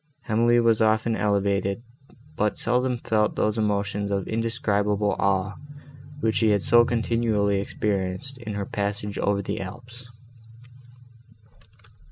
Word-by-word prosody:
Emily 120 +2 +3
was 115 -2 +3
often 110 +1 +2
elevated, 100 0 0 0.5
but 105 0 0
seldom 125 +1 +1
felt 110 -2 0
those 110 +1 0
emotions 100 -1 -1
of 100 -1 -2
indescribable 105 -3 0
awe 95 0 +1 0.7
which 110 -3 +1
she 110 - +3
had 100 -3 +2
so 120 +6 +6
continually 115 -4 +1
experienced, 100 +6 -3
in 110 -4 -6
her 100 -1 -3
passage 100 0 -3
over 100 0 0
the 100 +3 -3
Alps. 120 +5 -10
105 Hz, 120 wpm, -25 LUFS, 100-115 Hz, 0.7 s, so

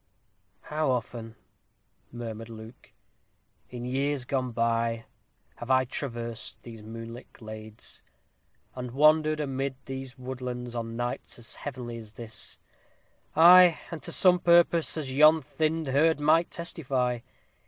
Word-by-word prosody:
"How 155 -1 -1
often," 115 -2 -3 0.8
murmured 115 -1 -7
Luke, 110 +1 -12 0.8
"in 120 -1 -6
years 135 +1 -1
gone 130 -1 -1
by, 115 0 0 0.5
have 120 - -8
I 130 0 +4
traversed 120 -4 -4
these 115 -2 -10
moonlit 115 +3 -9
glades, 110 -1 -9 0.7
and 125 -1 -5
wandered 155 +3 +4
amidst 135 -2 -3
these 135 0 -7
woodlands, 125 -1 -5
on 115 -1 -4
nights 120 -1 -4
heavenly 125 -4 -6
as 110 -2 -11
this 115 -1 -6 0.8
ay, 175 +1 +8
and 165 -3 -6
to - - -5
some 180 -1 +5
purpose, 170 -1 +4
as 140 -4 -3
yon 155 +3 +7
thinned 155 +2 -1
herd 150 +3 +3
might 160 +3 +3
testify! 130 -8 -2
130 Hz, 120 wpm, -28 LUFS, 115-150 Hz, 0.8 s, ay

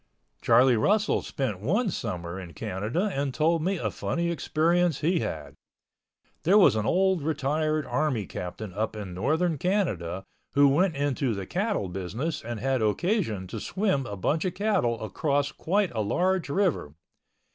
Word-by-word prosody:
Charlie 125 -1 +5
Russell 210 - +2
spent 120 -9 -3
one 195 - +1
summer 90 - -4
in 90 -3 -9
Canada 110 - -2
and 140 0 -1
told 160 +4 +2
me 190 +4 0
a - - -2
funny 170 0 -2
experience 170 0 +1
he 170 +3 +2
had. 75 - -4 0.9
There 190 +5 +4
was 195 - +6
an 110 0 0
old 190 -1 +2
retired 155 +1 0
army 145 -9 0
captain 90 +3 -6
up 110 +3 -2
in 100 -4 -6
northern 155 - 0
Canada 95 - -1 0.3
who 140 0 +6
went 165 +4 +2
into 140 -4 0
the 100 -1 -5
cattle 195 - -1
business 95 - -4
and 120 -1 -5
had 130 +1 0
occasion 110 - 0
to 110 - -5
swim 185 - -1
a 100 - -6
bunch 150 - 0
of 185 - -2
cattle 185 - +1
across 145 - 0
quite 195 +1 0
a 110 - -2
large 180 - 0
river. 155 - 0
140 Hz, 155 wpm, -27 LUFS, 105-175 Hz, 0.9 s, was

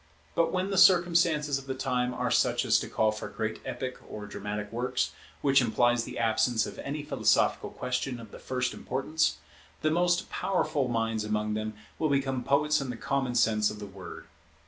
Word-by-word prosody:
But 165 0 +2
when 185 +2 -1
the 195 - +2
circumstances 170 -5 +4
of 135 - -13
the 130 - -2
time 125 -2 0
are - - -2
such - - +2
as - - +4
to - - -5
call 110 -1 +2
for 105 0 -6
great 110 +1 -4
epic 130 -1 -5
or 105 -1 -7
dramatic 105 0 -5
works, 125 +2 -1 0.3
which 135 -1 +5
implies 120 0 +2
the - - -7
absence 115 0 +2
of - - -8
any 145 +1 -4
philosophical 150 - +2
question 125 0 -3
of 115 -3 -11
the - - -10
first 125 -1 -2
importance, 145 +5 -1 0.5
the 155 - +3
most 175 +2 +2
powerful 155 -8 0
minds 115 -2 -1
among 105 0 -1
them 110 0 -3 0.3
will 155 - +1
become 135 -2 0
poets 150 +2 +2
in 135 - -4
the 120 - -4
common 135 -2 -1
sense 110 -2 +3
of 105 - -7
the 105 - -7
word. 95 -4 -10
125 Hz, 190 wpm, -29 LUFS, 110-145 Hz, 0.5 s, which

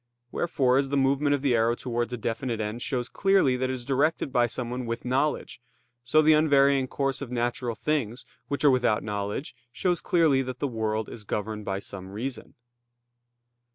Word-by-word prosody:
Wherefore, 135 -6 +2
as 135 -1 -1
the 140 - 0
movement 140 +2 +2
of 140 - -5
the 135 -3 +3
arrow 115 +1 +2
towards 120 -1 -3
a 125 - -3
definite 115 +1 -3
end 110 +2 -3
shows 125 -2 -2
clearly 195 -10 +3
that 130 0 -1
it - - -1
is 125 -2 -6
directed 140 +1 0
by 120 -1 +4
someone 125 +1 -4
with 115 +1 -4
knowledge, 135 +1 -1 0.4
so 155 +6 +4
the 155 +1 +6
unvarying 140 -3 +4
course 135 0 -2
of 140 - -5
natural 120 -1 -2
things 125 -6 -2 0.2
which 140 +1 -2
are 145 - +7
without 120 -6 +2
knowledge, 105 +5 -4 0.2
shows 175 +5 0
clearly 160 -6 +3
that 130 -1 -5
the 145 - -1
world 110 -3 -2
is 110 - -8
governed 105 +1 -4
by 95 - -2
some 100 -1 -8
reason. 115 +5 -6
125 Hz, 185 wpm, -27 LUFS, 115-140 Hz, 0.4 s, are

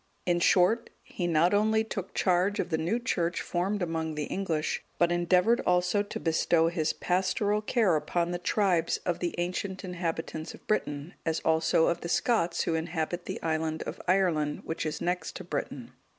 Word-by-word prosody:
In 175 -1 +2
short, 190 +7 +3
he 175 - -4
not 170 +2 +3
only 220 +2 +3
took 195 -4 -6
charge 185 +3 +2
of - - -1
the 160 - +2
new 170 +9 0
Church 175 -8 -1
formed 190 +3 -1
among 160 -2 -2
the 150 - -2
English, 160 -2 -2
but 175 0 +3
endeavoured 180 +6 +3
also 180 +2 +2
to 205 - -5
bestow 165 0 +2
his 165 -2 0
pastoral 205 +4 0
care 215 -5 +2
upon 170 +3 -1
the 175 - -2
tribes 180 -3 +1
of 175 - -1
the 175 -1 -2
ancient 185 +2 -3
inhabitants 165 -3 -4
of - - -19
Britain, 150 -6 -2
as 160 -1 0
also 160 0 +3
of 170 - 0
the 170 - -5
Scots, 175 -6 +1
who 165 - -1
inhabit 160 +1 -2
the - - -4
island 160 0 -1
of - - -6
Ireland,(183) 170 -6 +1
which 160 -1 -3
is 155 - -4
next 175 -2 -2
to - - -6
Britain. 140 -6 -5
175 Hz, 180 wpm, -29 LUFS, 160-190 Hz, -, short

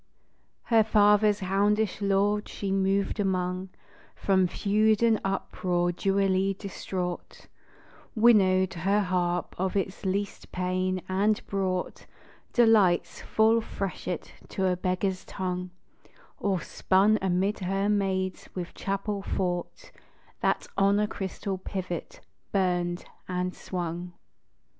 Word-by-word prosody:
Her 225 -2 +4
father's 210 -1 +4
houndish 205 +2 +1
lords 200 +1 +1
she 195 -1 -4
moved 195 +2 +1
among, 185 -1 -1 0.5
From 190 -2 +2
feud 215 +4 +2
and 225 -2 +3
uproar 180 -2 -1
dewily 195 +1 +1
distraught; 180 -2 -5 0.7
Winnowed 190 -5 +4
her 195 +4 +1
harp 180 -2 -1
of 190 +1 -1
its 195 0 -2
least 200 +1 -3
pain; 185 0 -1
and 205 +3 +1
brought 185 -2 -2 0.4
Delight's 215 -7 +3
full 225 +1 +3
freshet 185 -4 -5 0.2
to 190 - -1
a 185 -1 +2
beggar's 185 +1 -1
tongue, 180 -1 -4 0.7
Or 195 -4 0
spun 200 +7 +2
amid 190 +2 0
her 195 +1 0
maids 190 -2 -1
with 180 -2 -5
chapel 200 +1 -3
thought 180 -2 -3 0.5
That - - +1
on 200 +1 +4
a 210 - +2
crystal 195 -1 -4
pivot 185 -3 -5 0.3
burned 175 -2 0 0.2
and 180 0 -2
swung. 175 0 -5
190 Hz, 110 wpm, -27 LUFS, 185-205 Hz, 0.7 s, Her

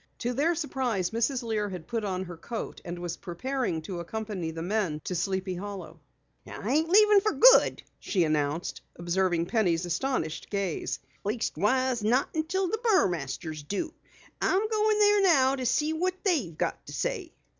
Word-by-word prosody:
To 245 0 -2
their 310 +7 +2
surprise 255 - -1
Mrs. 240 +3 0
Lear 215 -3 -1
had 180 -4 -7
put 230 +2 -3
on 190 -2 -2
her 175 -2 -8
coat 225 +7 -6
and 175 0 -6
was 175 -1 -4
preparing 180 -2 -3
to 175 +1 -5
accompany 200 -1 -4
the 165 0 -5
men 185 -5 -1
to - - -3
Sleepy 190 +1 -1
Hollow. 180 -4 -7 0.5
"I 215 - -4
ain't 320 +2 +2
leavin' 420 +1 +6
fer 425 +1 +1
good," - - +6 0.2
she 185 -4 +1
announced, 155 +1 -1
observing 175 0 0
Penny's 180 -5 +1
astonished 175 - -2
gaze. 200 -5 -2 0.3
"Leastwise, 240 +3 0
not 245 +5 +2
unless 315 0 -2
the 380 +3 0
Burmasters 170 - 0
do. 205 - -3 0.5
I'm 395 +3 +2
going 430 -1 +2
there 415 -1 +5
now 275 -8 +4
to 255 -2 -2
see 300 +5 +1
what 365 +3 0
they've 270 - 0
got - - -2
to - - -8
say." - - -2
215 Hz, 165 wpm, -28 LUFS, -, 0.5 s, leavin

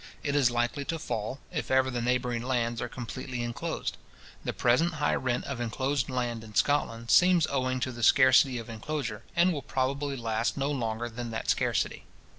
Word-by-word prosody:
It 145 -1 -1
is 135 -4 +4
likely 120 +4 -1
to 165 - -2
fall, 120 -2 -4
if 155 -4 -3
ever 130 0 +3
the 120 -1 -2
neighbouring 125 -1 0
lands 120 -2 -1
are 120 - -3
completely 125 0 -5
inclosed. 120 0 -3 0.5
The - - -1
present 160 +8 +2
high 145 -1 +1
rent 125 -1 0
of 135 -3 -4
inclosed 130 +3 -1
land 120 -3 -2
in 110 -1 -12
Scotland 115 -4 +1
seems 180 -3 +6
owing 130 -2 0
to 130 - -1
the 120 -1 -8
scarcity 130 +1 +6
of 115 - -6
inclosure, 115 0 -4
and 175 +1 +4
will 145 - -3
probably 140 +2 -1
last 115 0 -1
no 140 +1 0
longer 115 -3 -2
than 120 0 -6
that 110 -1 -1
scarcity. - - -1
125 Hz, 185 wpm, -29 LUFS, 120-140 Hz, 0.5 s, seems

